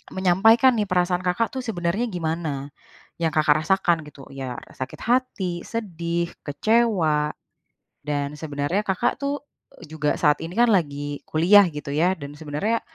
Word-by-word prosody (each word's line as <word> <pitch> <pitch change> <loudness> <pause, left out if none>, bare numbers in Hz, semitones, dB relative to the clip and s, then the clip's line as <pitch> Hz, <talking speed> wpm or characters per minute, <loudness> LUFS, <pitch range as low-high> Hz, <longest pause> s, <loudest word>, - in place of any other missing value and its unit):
menyampaikan 220 +8 +5
nih, 205 - 0
perasaan 180 -1 +1
Kakak 180 +6 0
tuh, 265 - -3
sebenarnya 195 +2 -1
gimana, 160 -5 -3 0.5
yang 165 -2 +1
Kakak 155 0 +4
rasakan, 175 -4 +2
gitu. 140 -2 -13
Ya 130 -2 -5 0.2
sakit 130 0 -7
hati, 230 -8 0
sedih, 170 -6 -3
kecewa, 160 -4 +1 0.7
dan 145 0 -2
sebenarnya 150 +5 -1
Kakak 190 -1 0
tuh, 280 +1 -2 0.4
juga 150 -1 -1
saat 150 -1 +3
ini 165 - -6
kan, 240 0 +5
lagi 145 -6 -1
kuliah, 190 +6 +6
gitu 150 -2 -7
ya, 175 +5 +3
dan 140 -1 -8
sebenarnya 160 +10 -1
170 Hz, 140 wpm, -23 LUFS, 150-200 Hz, 0.7 s, kuliah